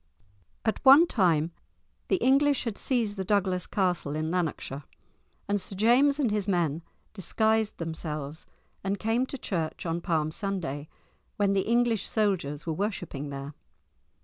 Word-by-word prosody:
At 220 - -1
one 275 +5 +9
time 170 - +2 0.6
the - - +3
English 280 -2 +3
had 230 -5 -3
seized 225 -5 -1
the 190 - -1
Douglas 190 -2 0
castle 175 -7 0
in 155 +1 -2
Lanarkshire, 155 -5 -2 0.6
and 205 -1 0
Sir 195 - -4
James 250 +8 +4
and 250 -7 +2
his 210 -1 0
men 170 -5 +1 0.3
disguised 220 +2 +1
themselves 155 -2 -5 0.4
and 195 +1 -1
came 225 +5 0
to 275 - -5
church 170 -10 -3
on 165 0 -2
Palm 155 -3 0
Sunday, 160 -7 -4 0.5
when 200 -1 +2
the 195 -1 0
English 235 -3 +2
soldiers 185 -9 0
were 165 - -1
worshipping 175 -6 -3
there. 140 +1 -6
195 Hz, 145 wpm, -28 LUFS, 160-220 Hz, 0.6 s, one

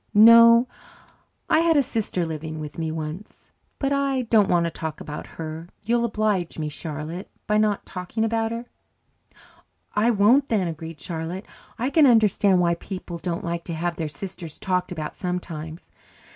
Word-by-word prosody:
"No. 230 +2 +8 0.8
I 315 - +4
had 330 -1 +3
a 285 - +5
sister 220 -8 -2
living 155 0 -5
with 150 +1 -7
me 160 -1 -2
once. 160 +5 -7 0.3
But 275 0 0
I 275 -2 +1
don't 220 -4 +3
want 175 -1 +3
to 170 - -1
talk 160 -1 -5
about 150 0 -7
her. 160 +1 -6 0.2
You'll 235 +1 +2
oblige 210 -6 0
me, 155 -1 -2
Charlotte, 155 +4 -6 0.2
by 210 0 +2
not 210 -2 +1
talking 185 +5 -3
about 225 0 0
her." 230 +1 -5 1.3
"I 215 +3 +3
won't 235 +6 +4
then," 205 -8 +1
agreed 160 -1 -7
Charlotte. 170 +3 -5 0.3
"I 250 +4 -1
can 310 -3 +6
understand 210 -5 +4
why 170 -1 +3
people 175 0 -7
don't 170 0 -3
like 170 0 -3
to 170 - -4
have 170 +1 -2
their 160 -2 -2
sisters 170 +1 -7
talked 180 -1 -1
about 155 -4 -5
sometimes. 170 -3 -5
180 Hz, 165 wpm, -24 LUFS, 165-225 Hz, 1.3 s, No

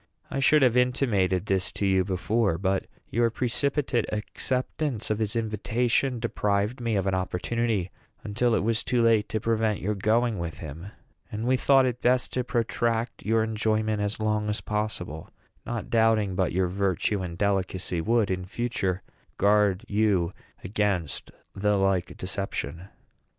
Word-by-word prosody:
I 135 - -1
should 145 +2 +5
have 125 -2 +4
intimated 115 -8 +2
this 95 -2 0
to 100 - -2
you 95 -1 +3
before; 100 0 0
but 95 +1 0 0.2
your 115 0 +2
precipitate 130 +1 0
acceptance 125 +3 -2
of 105 - 0
his 110 0 -1
invitation 115 +3 0
deprived 105 0 -1
me 115 -2 0
of 95 -1 0
an 95 - +1
opportunity 95 +2 -1 0.3
until 110 +2 +1
it - - +1
was 115 +1 +1
too 125 -2 +1
late 110 -2 +3
to 110 - -1
prevent 110 -2 0
your 105 +3 -1
going 110 +2 +1
with 85 -1 -4
him; 80 0 -8 0.4
and 110 +2 -3
we 130 +1 +3
thought 135 0 +4
it 125 -1 -2
best 125 0 +2
to 125 - 0
protract 115 -1 -1
your 110 0 +3
enjoyment 110 -1 0
as 105 +1 -2
long 105 -1 0
as 105 - -1
possible, 105 -7 -4 0.4
not 120 -2 -4
doubting 110 -3 +3
but 90 -1 0
your 95 +2 +1
virtue 95 +1 0
and 85 -2 -5
delicacy 95 -3 0
would, 110 +1 +2
in 90 0 -2
future, 100 -3 -2 0.3
guard 105 0 +3
you 100 -5 +1 0.3
against 95 -5 -1 0.2
the 105 +1 +1
like 95 -2 0
deception." 90 -3 -4
105 Hz, 155 wpm, -26 LUFS, 95-115 Hz, 0.4 s, should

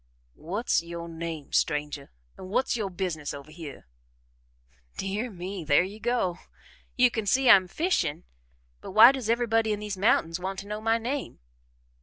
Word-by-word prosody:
"What's 195 +8 0
yo' 170 0 -7
name, 165 -3 -7
stranger, 150 -2 -1 0.3
an' - - -10
what's 250 +6 +1
yo' 215 -4 -2
business 175 -6 -4
over 140 +2 -11
hyeh?" 155 -4 -9 1.1
"Dear 205 +5 -3
me, 185 -1 -6
there 145 +2 +4
you 200 +4 -8
go! 220 -6 -1 0.6
You 250 -1 +5
can 220 -3 -3
see 260 +6 +3
I'm 190 -3 +6
fishing, 180 - -1 0.6
but - - -9
why 225 +4 +9
does 260 -5 -4
everybody 225 -2 +2
in 210 - -1
these 210 -2 -5
mountains 180 -4 +2
want 190 +1 -4
to 200 - -7
know 210 +1 -5
my 225 +1 +2
name?" 255 +5 -4
195 Hz, 160 wpm, -27 LUFS, 170-225 Hz, 1.1 s, why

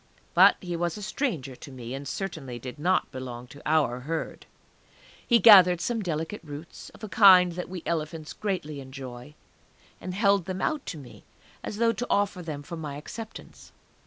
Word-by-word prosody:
But - - +7
he 175 -2 -4
was 170 +1 -2
a 210 - -7
stranger 180 - -3
to 140 - -11
me, 125 -2 -7
and 140 +1 -6
certainly 150 -9 -5
did 125 +4 -8
not 180 +4 +1
belong 125 -2 -7
to 145 - -13
our 145 -6 +2
Herd. 155 +5 -5 0.8
He 235 - +6
gathered 185 -5 +8
some 230 +4 -1
delicate 165 +2 -3
roots, 150 +1 -9
of - - -17
a - - -3
kind 190 -4 +7
that 180 +1 -6
we 180 -2 -7
elephants 155 -1 -3
greatly 180 -8 -3
enjoy, 130 0 -9 0.7
and 185 +1 -5
held 200 -3 +3
them 185 0 -4
out 305 +5 -1
to 165 - -5
me, 135 -4 -13 0.4
as 205 - -5
though 230 0 +3
to 245 - -4
offer 200 -2 +1
them 150 -4 -6
for 170 +4 -7
my 150 -3 -5
acceptance. 220 +9 -10
165 Hz, 180 wpm, -27 LUFS, 140-195 Hz, 0.8 s, gathered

